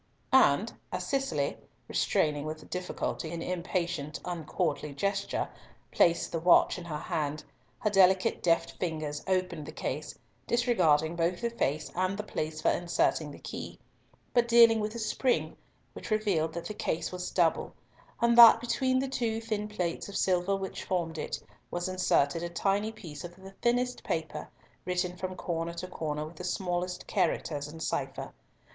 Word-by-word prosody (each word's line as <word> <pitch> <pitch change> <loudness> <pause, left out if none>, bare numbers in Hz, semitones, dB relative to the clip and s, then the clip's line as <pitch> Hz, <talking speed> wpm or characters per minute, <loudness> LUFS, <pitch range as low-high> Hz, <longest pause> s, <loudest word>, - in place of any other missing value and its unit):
And - - +5 0.2
as - - -3
Cicely, 215 - 0 0.3
restraining 145 -1 +1
with 155 0 -6
difficulty 180 -2 -3
an 165 -1 -4
impatient, 170 -4 -2
uncourtly 160 -3 -2
gesture, 200 +5 -1 0.4
placed 170 -1 +3
the 165 - -1
watch 175 +2 +5
in 175 - -9
her 155 -3 -4
hand, 150 0 -2 0.3
her 210 - 0
delicate 190 -1 +4
deft 165 -1 +2
fingers 155 -4 -3
opened 180 -5 -1
the - - -6
case, 150 +3 -4 0.3
disregarding 170 -10 +3
both 170 +1 0
the 235 - 0
face 155 -10 -1
and 185 +2 0
the 210 - -3
place 155 -6 -4
for - - +5
inserting 170 -3 +1
the 145 - -10
key; - - -7 0.6
but 240 -1 +4
dealing 230 -1 +7
with 215 +1 -2
a - - -3
spring, 240 +3 0 0.4
which - - -8
revealed 195 -8 +1
that 170 - -5
the 215 - -4
case 160 -5 -2
was 180 0 -4
double, 170 -3 +1 0.5
and 235 0 +4
that 235 -1 +10
between 255 +2 +1
the 270 +1 0
two 235 -4 -1
thin 215 -2 -2
plates 180 -3 -3
of 200 - -4
silver 185 +1 +2
which 195 -1 -5
formed 165 -3 -2
it, - - -3 0.3
was 175 +1 -2
inserted 175 -4 +2
a 175 - -3
tiny 200 +4 0
piece 160 -9 -9
of 175 0 -8
the 190 +1 -12
thinnest 245 +1 +1
paper, 160 -2 -3 0.3
written 180 0 -1
from 185 +1 -4
corner 170 -1 -3
to 170 - -4
corner 155 -4 -3
with 155 +1 -11
the - - -7
smallest 180 -1 -2
characters 145 -2 0
in 160 +2 -10
cipher. - - -3
180 Hz, 165 wpm, -30 LUFS, 160-205 Hz, 0.6 s, that